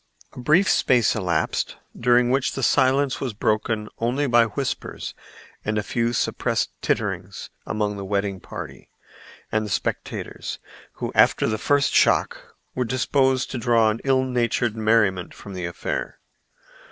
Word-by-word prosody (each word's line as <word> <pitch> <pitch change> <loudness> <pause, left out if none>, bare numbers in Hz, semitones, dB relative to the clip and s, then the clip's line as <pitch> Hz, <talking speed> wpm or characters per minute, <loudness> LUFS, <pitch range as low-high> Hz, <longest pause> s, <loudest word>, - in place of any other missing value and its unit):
A - - -10
brief 155 +10 +3
space 120 -4 +3
elapsed, 90 -7 -1 0.2
during 120 0 +3
which 135 0 +1
the 135 - -4
silence 130 +3 +2
was 125 -6 -3
broken 110 0 0
only 125 +5 0
by 120 -3 +5
whispers 110 - -4 0.5
and 105 0 -1
a 105 - 0
few 115 +2 0
suppressed 120 - 0
titterings - - -2 0.2
among 105 -1 -1
the 100 - -5
wedding 100 -1 -1
party - - -9 0.6
and 110 0 +1
the 105 - -5
spectators, 90 - -3 0.4
who - - -4
after - - +4
the 110 -1 -1
first 145 +3 +2
shock - - +2 0.2
were 125 - 0
disposed 130 +1 +1
to 130 - -3
draw 115 -2 +3
an 110 - -5
ill 135 -1 +3
natured 120 -2 0
merriment 110 -5 +1
from 100 - -10
the 90 -2 -4
affair. 85 - -4
115 Hz, 145 wpm, -23 LUFS, 105-130 Hz, 0.6 s, by